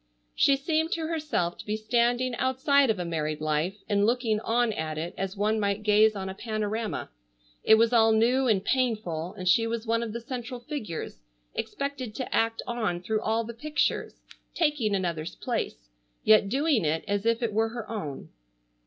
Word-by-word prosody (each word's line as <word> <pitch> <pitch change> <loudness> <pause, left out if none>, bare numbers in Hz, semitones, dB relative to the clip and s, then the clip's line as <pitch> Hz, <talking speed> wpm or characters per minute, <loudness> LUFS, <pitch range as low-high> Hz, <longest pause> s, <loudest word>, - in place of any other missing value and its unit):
She 275 - +4
seemed 315 +3 0
to 325 -1 -2
herself 300 - -1
to - - -8
be 210 +1 -1
standing 240 +3 +1
outside 265 +1 +3
of 220 - +2
a 180 - -3
married 155 -2 -2
life 155 +5 -1
and 205 -1 +2
looking 230 -1 +1
on 230 +1 +1
at 155 -4 -4
it 170 +3 -4
as 195 +1 -4
one 215 +2 +1
might 200 0 -1
gaze 215 +1 +5
on 190 -1 -4
a 190 - -4
panorama. 215 +1 -3 0.5
It 220 - +7
was 230 +2 +3
all 225 -1 +5
new 245 +4 +3
and 200 -5 +2
painful, 210 -10 -1
and 185 -1 -5
she 225 +5 +4
was 230 0 -3
one 230 0 +1
of 230 -2 -3
the 235 - -4
central 245 +1 -6
figures 240 - -6 0.3
expected 275 -6 -4
to 255 - -3
act 225 0 +1
on 220 -8 -2
through 215 +3 -1
all 225 +1 0
the 235 +1 -7
pictures, 295 +5 -2 0.3
taking 290 - +1
another's 170 -4 -2
place, - - -3 0.4
yet 215 -2 +5
doing 275 - +2
it 155 +1 0
as 200 -1 0
if 230 +1 +2
it 225 -3 -1
were 225 +1 +2
her 230 -1 -6
own. 175 -12 -5
220 Hz, 185 wpm, -27 LUFS, 200-245 Hz, 0.5 s, It